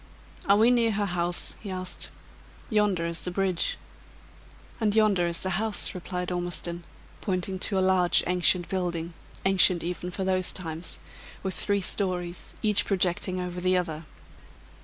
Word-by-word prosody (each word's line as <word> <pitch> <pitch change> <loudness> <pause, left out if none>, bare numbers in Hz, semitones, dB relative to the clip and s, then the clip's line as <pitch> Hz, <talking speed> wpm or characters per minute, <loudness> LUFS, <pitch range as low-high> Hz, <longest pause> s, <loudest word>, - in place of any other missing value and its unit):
"Are 200 - +7
we 225 +3 +5
near 230 -2 +3
her 205 0 0
house?" 175 -2 0
he 205 - -7
asked. 185 -1 -5 0.6
"Yonder 205 -5 +2
is 170 0 -3
the - - -4
bridge." 185 -1 0 1.0
"And 215 -2 +1
yonder 205 -5 +3
is 170 0 -2
the 190 - 0
house," 220 -1 +1
replied 180 0 -4
Ormiston, 175 -1 -2 0.4
pointing 185 -1 -2
to 195 +1 -1
a - - +3
large 185 -2 +4
ancient 180 0 +3
building 175 -3 -2 0.3
ancient 185 -2 +5
even 180 +1 -4
for 190 +2 -4
those 185 -1 +1
times 165 -2 -5 0.5
with 190 -1 -1
three 200 +4 +1
stories, 180 -2 -2
each 210 -2 +4
projecting 185 -1 0
over 180 0 -4
the 185 0 +3
other. 160 -3 -3
185 Hz, 150 wpm, -27 LUFS, 175-195 Hz, 1.0 s, Are